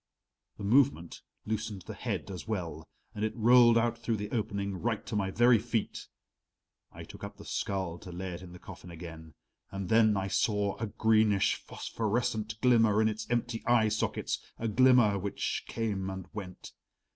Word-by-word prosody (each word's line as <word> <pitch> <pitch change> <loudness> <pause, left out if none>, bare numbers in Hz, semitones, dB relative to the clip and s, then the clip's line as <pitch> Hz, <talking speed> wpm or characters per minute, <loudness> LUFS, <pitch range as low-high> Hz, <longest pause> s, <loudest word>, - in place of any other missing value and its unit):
The - - -8
movement 115 -6 +2 0.2
loosened 110 -3 -3
the - - -7
head - - -4
as 90 +1 -7
well, 85 -7 -4 0.3
and 105 -1 -4
it 110 - -1
rolled 120 +1 +6
out 115 0 +1
through 115 -1 -1
the 105 0 -5
opening 100 -4 -2
right 115 -3 -1
to - - -5
my 100 -2 0
very 120 +3 +5
feet. 115 -1 -3 0.8
I - - -10
took - - -12
up - - -7
the - - -12
skull 95 -3 -3
to 90 - -10
lay 90 +1 -5
it 85 - -8
in 90 -1 -11
the 90 - -10
coffin 90 0 -11
again 80 -2 -10 0.3
and 95 -2 -5
then 110 -2 +4
I 95 0 -1
saw 100 0 0
a 115 - -3
greenish 110 -1 +3
phosphorescent 110 -1 -3
glimmer 115 -4 +4
in 110 0 +4
its 110 0 -5
empty 120 -1 -1
eye 120 -2 +4
sockets, 105 0 -1 0.2
a 115 - -2
glimmer 120 -3 +5
which 100 +1 -3
came 100 -4 -2
and 95 -1 -6
went. 95 -4 -8
105 Hz, 175 wpm, -30 LUFS, 95-115 Hz, 0.8 s, rolled